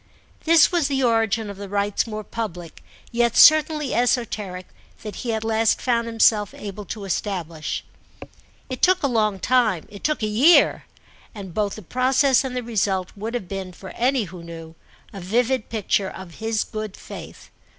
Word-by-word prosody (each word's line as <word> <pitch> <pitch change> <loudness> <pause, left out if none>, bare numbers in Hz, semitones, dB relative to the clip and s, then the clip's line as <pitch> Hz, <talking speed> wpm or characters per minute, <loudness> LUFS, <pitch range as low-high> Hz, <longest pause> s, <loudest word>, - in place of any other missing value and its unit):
This 325 -1 +6
was 340 -5 +1
the 270 -2 0
origin 225 -2 +1
of 200 -1 -8
the 200 -1 -8
rites 205 +2 0
more 215 -1 -5
public, 180 -7 -6 0.3
yet 235 -1 +1
certainly 305 -2 +6
esoteric, 220 -7 -1 0.4
that 210 -1 -7
he 240 - -3
at 220 -1 -2
last 225 0 +2
found 235 -2 0
himself 220 -2 +2
able 205 0 -7
to 200 +3 -6
establish. 170 -5 -3 0.8
It 255 -2 -6
took 370 -1 +4
a - - +3
long 215 -5 +1
time, 220 -5 +1
it 205 -1 -12
took 305 -6 0
a - - +3
year, 250 +11 +4 0.5
and 195 -4 -8
both 205 +1 -1
the 215 - -10
process 260 - +2
and 260 -1 -5
the 250 - -2
result 195 -5 -1
would 220 +4 -5
have 200 -7 -4
been—for 190 -1 -7
any 255 0 +1
who 180 -2 -9
knew—a 165 +3 -12
vivid 240 +6 0
picture 205 -3 0
of 185 -3 -11
his 220 -1 0
good 215 -2 -6
faith. - - -11
220 Hz, 165 wpm, -23 LUFS, 195-245 Hz, 0.8 s, This